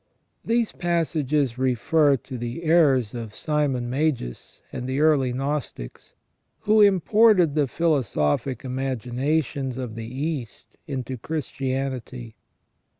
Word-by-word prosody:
These 230 -1 +1
passages 150 -7 0
refer 135 +3 +3
to 130 +2 -10
the 120 +6 -5
errors 145 -9 +3
of 115 -3 -7
Simon 145 -5 -1
Magus 130 - -3
and 125 +1 -4
the 130 +2 -1
earliest 140 -5 +3
Gnostics, 135 - -5 0.5
who 215 +1 +4
imported 200 -3 +5
the 150 -2 +1
philosophic 130 - 0
imaginations 130 +1 -2
of 125 -4 -5
the 115 +1 -7
East 130 -5 -5
into 130 -2 -4
Christianity. 130 -5 -4
135 Hz, 105 wpm, -24 LUFS, 125-155 Hz, 0.5 s, imported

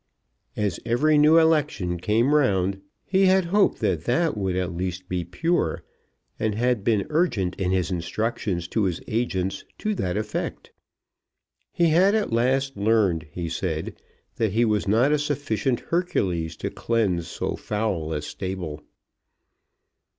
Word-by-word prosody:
As 105 -3 -1
every 145 +6 +3
new 155 +2 +6
election 150 - +2
came 115 - +2
round, 95 -9 +2 0.2
he 190 0 +3
had 190 -1 +4
hoped 200 +4 +2
that 85 -3 0
that 160 +4 +1
would 95 -3 -1
at 90 -1 -1
least 90 0 -4
be 90 -1 -2
pure, 165 - -1 0.6
and 110 -2 0
had 120 -2 +1
been 105 -2 +2
urgent 120 - +1
in 90 - +1
his 95 0 0
instructions 90 0 -2
to 110 -3 +1
his 90 -3 -1
agents 95 -5 -1
to 215 - -1
that 95 - -2
effect. 105 0 -4 1.0
He 170 -1 +2
had 185 +6 +4
at 210 - 0
last 135 +3 +1
learned, 100 -6 +2
he 85 +1 -4
said, 80 -1 -3 0.4
that 110 -4 0
he 115 +2 +3
was 105 -3 0
not 115 +8 +3
a 150 - +3
sufficient 140 -4 -1
Hercules 90 - -1
to - - -4
cleanse 100 -8 0
so - - -3
foul 105 -7 -2
a 75 -2 -2
stable. 90 -4 -5
105 Hz, 145 wpm, -24 LUFS, 90-145 Hz, 1.0 s, new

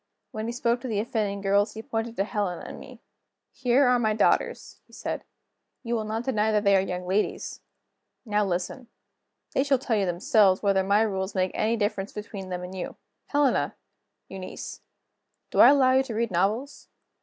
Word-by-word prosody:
When 220 +1 -4
he - - -2
spoke 240 0 0
to 260 - -5
the 215 -4 -1
offending 210 -3 -2
girls, 200 +2 +2
he 220 - -6
pointed 225 +1 -3
to 195 - +1
Helena 200 -4 -2
and - - -8
to - - -10
me. - - -12 0.5
"Here 255 +2 +3
are 250 0 +4
my 220 -2 +1
daughters," - - +1
he - - -24
said. - - -4 0.6
"You 235 -1 -3
will 220 -2 -1
not 220 +2 -3
deny 220 -4 +1
that 210 -1 +2
they 200 -1 +5
are 190 - +4
young 180 -1 -4
ladies. 195 +4 -1 0.6
Now 210 -1 +1
listen. 190 +7 -3 0.7
They 270 - +2
shall 280 -1 +3
tell 245 -2 -1
you 195 -2 +1
themselves 185 +2 +3
whether 195 -1 +3
my 200 +3 +3
rules 190 -2 -2
make 185 -1 +1
any 225 +2 +1
difference 205 -2 -2
between 200 -2 -7
them 180 0 -4
and 180 +1 -7
you. 185 - -5 0.3
Helena! 285 -3 +1 0.5
Eunice! 190 -1 -8 0.7
do - - -1
I - - +10
allow 270 -2 +5
you 260 +1 +5
to 255 -4 -5
read 230 -1 0
novels? 210 +10 -1
215 Hz, 190 wpm, -26 LUFS, 195-235 Hz, 0.7 s, I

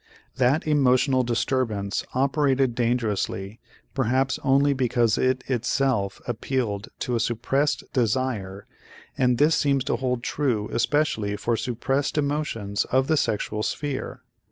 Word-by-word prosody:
That 130 +5 +2
emotional 135 -3 +3
disturbance 120 -4 -1
operated 135 -1 +2
dangerously 115 -4 -1 0.3
perhaps 130 +1 +1
only 140 +1 +3
because 120 -4 +1
it 130 0 +1
itself 120 -4 0
appealed 115 -3 -2
to 125 - -1
a - - +1
suppressed 135 +6 0
desire 110 -5 -1 0.5
and 125 -2 +2
this 150 +5 +4
seems 140 -3 +1
to 140 - -1
hold 125 -2 -2
true 120 -8 -1
especially 115 -4 +1
for 115 +3 -1
suppressed 135 +6 -1
emotions 140 -9 -1
of 130 +1 +2
the 155 - +2
sexual 105 -5 -1
sphere. 145 +4 -4
125 Hz, 120 wpm, -25 LUFS, 115-135 Hz, 0.5 s, this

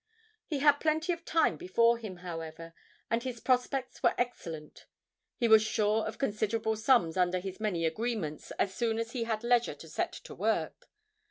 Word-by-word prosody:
He 305 - -1
had 290 +1 +5
plenty 315 +2 +1
of 335 0 -9
time 320 - +2
before 230 +8 +3
him, 215 -5 -7
however, 165 -1 -7 0.4
and 230 +1 +2
his 250 -2 -5
prospects 255 +1 0
were - - +3
excellent; 165 -11 -5 0.5
he 235 - +2
was 220 -1 +8
sure 215 0 +1
of 220 - -6
considerable 220 -2 0
sums 220 -7 +3
under 180 0 +2
his 190 +1 -6
many 190 -6 0
agreements 165 -3 -2
as 195 - 0
soon 225 +1 0
as 230 0 -3
he 235 -2 -2
had 220 -1 -2
leisure 240 0 +2
to - - -12
set - - -2
to - - -10
work. - - -2
220 Hz, 175 wpm, -31 LUFS, 185-245 Hz, 0.5 s, was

